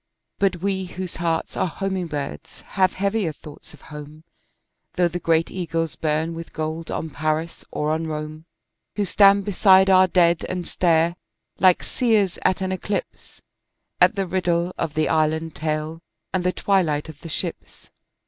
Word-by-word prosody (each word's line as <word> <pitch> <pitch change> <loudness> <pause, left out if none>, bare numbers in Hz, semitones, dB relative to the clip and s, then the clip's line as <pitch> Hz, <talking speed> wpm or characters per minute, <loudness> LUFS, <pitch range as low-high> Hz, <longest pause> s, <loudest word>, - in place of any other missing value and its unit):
But 190 -3 +1
we 190 -1 0
whose 185 0 -7
hearts 165 -1 -1
are - - +1
homing 190 0 -3
birds 140 - -6
have 185 -1 +1
heavier 200 -2 0
thoughts 150 0 -13
of 150 - -16
home, 150 +1 -10 0.7
Though 180 -1 +3
the 175 +1 -4
great 165 -1 +1
eagles 165 -3 -2
burn 155 +1 -1
with 165 0 -8
gold 160 +1 -4
on 160 - -3
Paris 155 +3 -2
or 150 +1 -1
on 160 +1 -1
Rome, 155 +1 -5 0.5
Who 205 - 0
stand 200 0 +5
beside 190 -1 +5
our 185 0 +6
dead 170 -2 +3
and 180 -1 -3
stare, 170 0 +2 0.4
like 185 -2 +5
seers 215 -7 +1
at 190 - +2
an 190 0 -1
eclipse, 195 +2 -5 0.6
At - - +5
the 195 -1 0
riddle 175 -1 0
of 155 -2 -3
the 155 0 +2
island 160 0 +1
tale 155 +1 -3 0.3
and 185 -1 0
the 180 - +2
twilight 170 -8 +1
of 155 -2 -11
the 165 - -8
ships. - - -6
170 Hz, 160 wpm, -23 LUFS, 155-185 Hz, 0.7 s, our